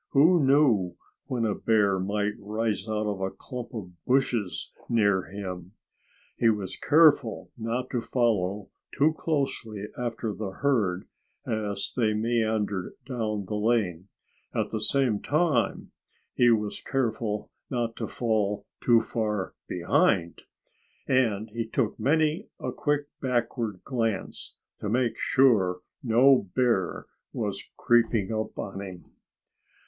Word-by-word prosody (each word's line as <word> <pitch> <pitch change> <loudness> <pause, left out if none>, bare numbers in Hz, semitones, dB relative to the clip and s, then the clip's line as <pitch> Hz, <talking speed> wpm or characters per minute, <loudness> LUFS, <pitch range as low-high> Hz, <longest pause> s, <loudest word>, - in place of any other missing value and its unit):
Who 160 +3 +5
knew 130 -10 +3 0.3
when 120 -3 -1
a 105 - +1
bear 100 -4 +2
might 105 +2 -1
rise 110 0 -2
out 110 0 -1
of 100 -2 -2
a 95 - 0
clump 125 +4 -8
of 95 -5 -6
bushes 125 -8 0 0.2
near 100 -5 +3
him? 90 -1 -7 0.6
He 115 - +4
was 105 -4 -1
careful 145 -7 +4
not 115 +2 -3
to 120 - 0
follow 105 -6 0 0.3
too 155 +3 +4
closely 130 -10 -2
after 115 -3 -3
the 100 -2 -5
herd 105 -10 +1 0.4
as 105 -3 -2
they 110 -4 +2
meandered 110 -4 0
down 110 -6 -2
the 100 - -5
lane. 105 -5 0 0.5
At - - 0
the 110 - -1
same 120 -2 +1
time, 150 -5 +1 0.4
he 120 - +4
was 105 -3 +1
careful 115 -5 -2 0.2
not 120 -3 -1
to - - -3
fall 105 -3 -1 0.2
too 120 -2 +5
far 105 -3 -2 0.2
behind. 85 +1 +1 0.7
And 110 -5 +1
he 115 0 -3
took 115 -1 -1
many 155 - +2
a - - -3
quick 145 -1 0 0.2
backward 120 -5 -1
glance, 115 -6 -3 0.2
to 105 - -3
make 120 +1 0
sure 100 -9 +3 0.2
no 125 -3 +4
bear 120 -8 +1 0.3
was 100 -4 -3
creeping 115 -4 +2
up 110 0 -3
on 95 0 -5
him. 95 -3 -8
110 Hz, 125 wpm, -27 LUFS, 100-125 Hz, 0.7 s, Who